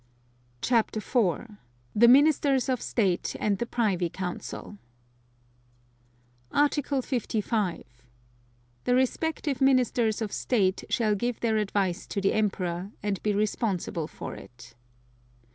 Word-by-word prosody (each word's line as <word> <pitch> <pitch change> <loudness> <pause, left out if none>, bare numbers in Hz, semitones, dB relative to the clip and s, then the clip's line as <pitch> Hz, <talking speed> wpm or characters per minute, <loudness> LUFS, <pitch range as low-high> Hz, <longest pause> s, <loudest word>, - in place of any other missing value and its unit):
CHAPTER 230 -3 +2
IV. 215 -1 -1 0.4
THE 235 +3 +6
MINISTERS 275 0 +4
OF 255 -3 0
STATE 195 -7 0
AND 200 -2 0
THE 235 - -2
PRIVY 195 -8 0
COUNCIL 190 +3 -6 1.7
Article 290 -2 +1
55. 215 -6 -1 1.0
The 245 - +3
respective 275 +1 0
Ministers 250 -4 +3
of 210 - -4
State 195 -6 0
shall 220 -3 +2
give 240 +3 -2
their 225 -2 +1
advice 200 -3 -1
to 200 - -3
the 195 0 +1
Emperor, 185 -3 -1
and 205 -2 -1
be 210 - +1
responsible 200 -6 -1
for - - -7
it. 120 -1 -13
215 Hz, 110 wpm, -27 LUFS, 195-250 Hz, 1.7 s, THE